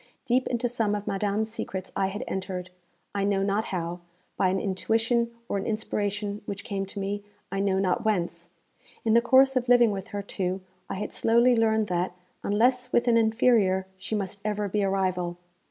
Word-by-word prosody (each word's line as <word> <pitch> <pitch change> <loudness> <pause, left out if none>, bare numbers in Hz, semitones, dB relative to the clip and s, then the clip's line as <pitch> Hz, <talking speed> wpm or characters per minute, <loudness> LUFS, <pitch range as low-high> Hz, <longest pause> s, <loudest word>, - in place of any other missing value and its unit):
Deep 255 +2 +2
into 245 0 0
some 225 -3 0
of 205 0 -4
madame's 205 +2 0
secrets 190 -4 -5
I 195 - +2
had 200 +2 -4
entered, 185 -1 -4 0.4
I 200 -1 0
know 200 -1 +2
not 205 +3 +1
how 175 -1 -3 0.4
by 185 - +2
an 190 +1 +1
intuition 225 +5 +1 0.2
or 200 - -1
an 195 - -4
inspiration 205 -1 -2
which 200 0 -5
came 195 -1 -3
to 200 - -7
me, 200 +1 -3 0.3
I 195 - -1
know 195 -1 +2
not 190 -2 +1
whence. 175 -5 -1 0.6
In 220 - +3
the 235 - +6
course 265 +2 +5
of 250 -1 0
living 240 -2 +6
with 195 0 -4
her, 205 -2 -4
too, 190 -1 -2 0.3
I - - -3
had 200 - -4
slowly 235 +2 +4
learned 220 -1 +3
that, 180 0 0 0.3
unless 250 +4 +2
with 240 +1 +2
an 235 - +5
inferior, 220 -4 +3
she 190 +3 -4
must 200 -1 -3
ever 210 -1 -1
be 205 +2 0
a 195 - +2
rival. 185 -2 -1
205 Hz, 190 wpm, -27 LUFS, 190-225 Hz, 0.6 s, the